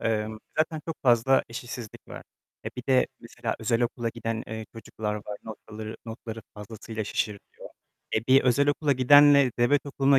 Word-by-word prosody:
emm, 110 -1 -1 0.2
zaten 155 0 +1
çok 165 - -4
fazla 125 +1 +4
eşitsizlik 115 -1 -8
var. - - -8 0.4
E, - - -2
bir 125 - -5
de 130 -1 +4
mesela - - -4
özel 115 +1 +1
okula 120 0 -1
giden, 115 -1 -4
eee, 110 0 -5
çocuklar 110 -1 -4
var. 105 -1 -6
Noktaları, 110 0 -8
notları 115 0 -7
fazlasıyla 110 +1 -6
şişiriliyor. 105 0 -4 0.5
E, 110 +1 -1
bir 135 0 +6
özel 130 +3 +3
okula 145 0 +2
gidenle 140 +1 +7
devlet 140 +4 +3
okuluna 140 -1 +3
115 Hz, 160 wpm, -27 LUFS, 110-135 Hz, 0.5 s, gidenle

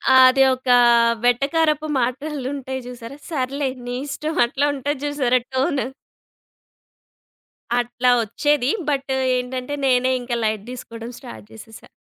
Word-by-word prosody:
అది 260 +1 +7
ఒక 255 0 -7 0.5
వెటకారపు 300 +5 +2
మాటలుంటాయి 265 0 -3
చూసారా! 250 +2 -9
"సర్లే, 275 -2 -2 0.2
నీ 245 0 -4
ఇష్టం." 305 +3 -4
అట్లా 275 +3 0
ఉంటది 280 +1 -3
చూసారా 265 -4 +1
టోన్. 265 +1 +1 2.0
అట్లా 245 +1 +1
వచ్చేది. 285 +4 0 0.2
బట్ 275 -1 -1 0.3
ఏంటంటే 250 +2 -4
నేనే 255 0 +3
ఇంకా 240 -1 -3
లైట్ 215 -1 -2
తీసుకోవడం 230 -1 -8
స్టార్ట్ 245 -5 -11
చేసేసా. 225 0 -13
260 Hz, 110 wpm, -21 LUFS, 245-285 Hz, 2.0 s, అది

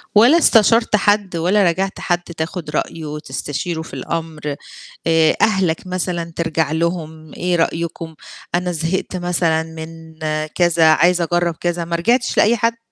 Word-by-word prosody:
ولا 240 +10 +7
استشرت 230 - +4
حد 205 -2 +1
ولا 180 +5 +2
راجعت 190 +2 0
حد 175 -1 0
تاخُد 165 0 -5
رأيه 155 +1 -3
وتستشيره 150 +2 -4
في 160 - -11
الأمر؟ 155 -3 -4 0.5
آآ 160 -1 +4
أهلك 190 -5 +1
مثلًا 175 -2 -3
ترجع 160 -2 -1
لهم، 160 -2 -3
إيه 180 0 -1
رأيكم؟ 165 -1 -2 0.4
أنا 180 0 -1
زهقت 170 +3 -2
مثلًا 175 -2 0
من 160 0 -10 0.4
كذا، 170 -2 +3
عايز 175 +2 +3
أجرّب 175 0 0
كذا، 175 0 -2
ما 170 0 -2
رجعتش 235 +8 +1
لأي 235 +3 +4
حد؟ 230 +1 -2
170 Hz, 140 wpm, -19 LUFS, 160-185 Hz, 0.5 s, ولا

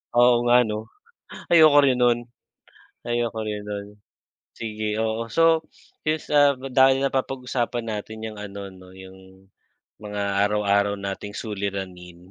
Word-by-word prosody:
Oo 120 0 +5
nga 120 +1 +6
'no? 110 +1 -5 0.6
Ayoko 155 -3 +7
rin 130 - +3
no'n 120 -1 +4 0.9
ayoko 120 -1 -1
rin 105 -1 -4
no'n, 100 0 -5 0.7
sige, 110 -1 -3
oo. 115 +1 -2
So, 165 +4 +3 0.4
since, 155 0 -1
ah, 145 -1 +6
dahil 135 0 +3
napapag-usapan 125 -3 -2
natin 110 0 -6
'yong 110 -1 -8
ano 100 -1 -7
'no, 95 0 -15
'yong 95 0 -15 0.6
mga 105 -1 -4 0.2
araw-araw 100 -1 +1
nating 100 +1 -6
suliranin. 95 -4 -6
110 Hz, 120 wpm, -24 LUFS, 100-125 Hz, 0.9 s, Ayoko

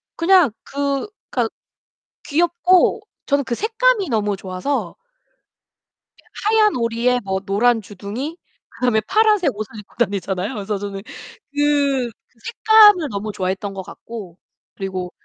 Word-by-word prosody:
그냥 340 - +4
그 280 +3 -2 0.2
그니까 - - 0 0.8
귀엽고 345 +6 +3 0.2
저는 280 -1 +1
그 240 - -3
색감이 450 - +1
너무 210 -3 0
좋아서 190 +9 -3 1.5
하얀 430 -1 +4
오리에 235 +1 +1
뭐 190 -1 -1
노란 225 +4 +2
주둥이, 215 - -6 0.3
그다음에 245 -4 0
파란색 420 - +3
옷을 215 +1 -7
입고 210 - -15
다니잖아요. 200 -1 -1
그래서 205 -1 -3
저는 195 0 -6 0.5
그 285 -4 +1 0.3
색감을 420 - +5
너무 210 +1 -4
좋아했던 190 +1 -3
것 190 - -5
같고 190 -2 -10 0.4
그리고 185 -2 -4
240 Hz, 270 characters per minute, -20 LUFS, 200-330 Hz, 1.5 s, 색감을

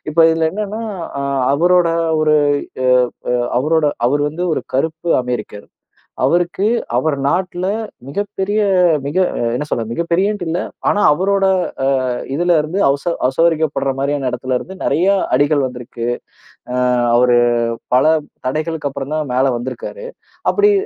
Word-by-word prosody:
இப்போ 165 +2 +4
இதுல 160 0 +1
என்னன்னா 210 +2 -4 0.4
அ - - -2 0.3
அவரோட 175 +3 +3 0.3
ஒரு 155 0 +3 0.5
அ - - +3 0.4
அ - - +2 0.3
அவரோட 155 +2 +2 0.2
அவர் 145 +2 +1
வந்து 175 +4 -4
ஒரு - - -3
கருப்பு 160 +4 -1
அமெரிக்கர். 110 -4 -5 0.6
அவருக்கு 175 +3 +1 0.3
அவர் 145 +3 +1
நாட்ல 180 +2 -1 0.4
மிகப்பெரிய 205 +5 -2 0.5
மிக 145 +5 -4 0.4
என்ன 150 - -2
சொல்றது 115 -4 -3
மிகப்பெரியன்ட்டு 175 - 0
இல்ல. 170 +3 -1 0.3
ஆனா 205 - +1
அவரோட 195 +3 +1 0.6
அ - - 0 0.3
இதுலேருந்து 170 +1 +1
அசோ 145 +5 0 0.2
அசௌகரியப்படுற 155 -1 +1
மாரியான 140 -2 -1
இடத்திலருந்து 130 +8 -3
நிறைய 165 +7 +1 0.3
அடிகள் 145 +1 +2
வந்திருக்கு. 120 -1 -7 0.7
அ - - -1 0.4
அவரு 120 0 +4 0.6
பல 130 - +4 0.4
தடைகளுக்கு 155 +1 -2
அப்பறம் 140 +2 -5
தான் 150 -5 -2
மேல 130 +1 +2
வந்திருக்காரு. 130 - -6 0.5
அப்படி 415 0 +4
155 Hz, 125 wpm, -17 LUFS, 135-175 Hz, 0.7 s, இப்போ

